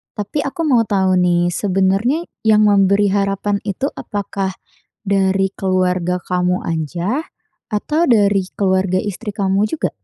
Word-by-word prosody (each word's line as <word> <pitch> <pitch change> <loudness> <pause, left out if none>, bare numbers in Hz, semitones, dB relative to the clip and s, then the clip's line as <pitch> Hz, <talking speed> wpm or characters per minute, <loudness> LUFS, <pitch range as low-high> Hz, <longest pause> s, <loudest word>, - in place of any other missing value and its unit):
Tapi 210 +8 -3
aku 275 +4 -4
mau 255 -7 +3
tahu 190 -2 +2
nih, 175 -1 +2
sebenarnya 195 - +1 0.2
yang 215 -1 +5
memberi 200 0 +3
harapan 200 0 0
itu, 210 +8 -1
apakah 195 -2 -4 0.5
dari 195 -1 +1
keluarga 180 -1 0
kamu 180 0 -1
aja 170 - -2 0.5
atau 300 +10 0
dari 205 - +3
keluarga 190 -1 +1
istri 210 +2 -5
kamu 195 0 +1
juga? 320 - -2
195 Hz, 125 wpm, -18 LUFS, 185-210 Hz, 0.5 s, yang